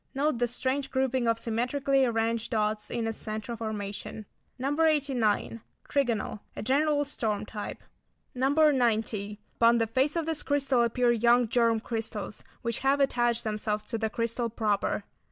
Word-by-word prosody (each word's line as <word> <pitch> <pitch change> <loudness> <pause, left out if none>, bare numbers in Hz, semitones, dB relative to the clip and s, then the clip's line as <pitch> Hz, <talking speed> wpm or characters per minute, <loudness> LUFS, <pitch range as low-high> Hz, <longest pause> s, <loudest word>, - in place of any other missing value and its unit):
Note 280 -2 +1
the 245 - +2
strange 260 +3 -2
grouping 260 -2 0
of 230 0 +2
symmetrically 260 +4 +1
arranged 230 -1 0
dots 215 -2 -1
in 235 -1 -2
its 225 -1 -3
centre 215 +2 -4
formation. 215 -1 -5 0.3
No. 280 +5 -1
89. 260 -8 +1 0.3
Trigonal. 240 -6 0 0.2
A - - -5
general 290 +4 +2
storm 220 -7 -2
type. 210 -1 -7 0.5
No. 260 0 +1
90. 230 -8 +2 0.2
Upon 235 0 +5
the 225 - +2
face 260 +7 +1
of 335 -2 0
this 320 -2 -1
crystal 275 -3 +2
appear 240 +1 +2
young 240 +1 +4
germ 230 -1 +2
crystals 220 -2 -4 0.2
which 235 -1 -2
have 275 +1 +2
attached 240 -4 +2
themselves 210 -1 -2
to 225 +1 -4
the 220 0 0
crystal 230 +1 -1
proper. 210 -2 0
235 Hz, 155 wpm, -28 LUFS, 220-270 Hz, 0.5 s, Upon